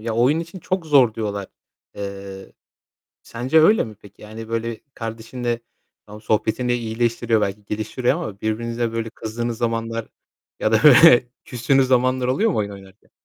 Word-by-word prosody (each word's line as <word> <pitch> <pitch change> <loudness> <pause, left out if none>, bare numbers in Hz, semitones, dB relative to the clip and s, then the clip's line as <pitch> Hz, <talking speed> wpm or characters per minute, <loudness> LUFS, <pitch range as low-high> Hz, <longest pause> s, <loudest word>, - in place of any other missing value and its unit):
Ya, 115 +1 -3
oyun 130 +8 +3
için 170 +3 -8
çok 185 0 -3
zor 135 -7 +4
diyorlar. 100 -3 -3 0.5
Eee, 100 -1 -8 0.7
sence 130 +7 +1
öyle 210 - +5
mi 110 - -10
peki? 100 0 -18
Yani 110 +1 -9
böyle 115 0 -3
kardeşinle 115 +1 -4 0.5
Tamam 105 +1 -11
sohbetinle 110 +3 0
iyileştiriyor 115 0 0
belki 105 0 -3
geliştiriyor 110 +5 -1
ama 125 - -6
birbirinize 115 +1 -2
böyle 115 0 -3
kızdığınız 115 +1 -4
zamanlar 115 -1 -2 0.5
ya 110 - +1
da 110 +1 +3
böyle 135 -3 +8 0.2
küstüğünüz 130 +2 +1
zamanlar 130 0 +2
oluyor 205 - +2
mu 170 - -1
oyun 100 -1 -1
oynarken? 95 0 -14
115 Hz, 150 wpm, -21 LUFS, 110-125 Hz, 0.7 s, böyle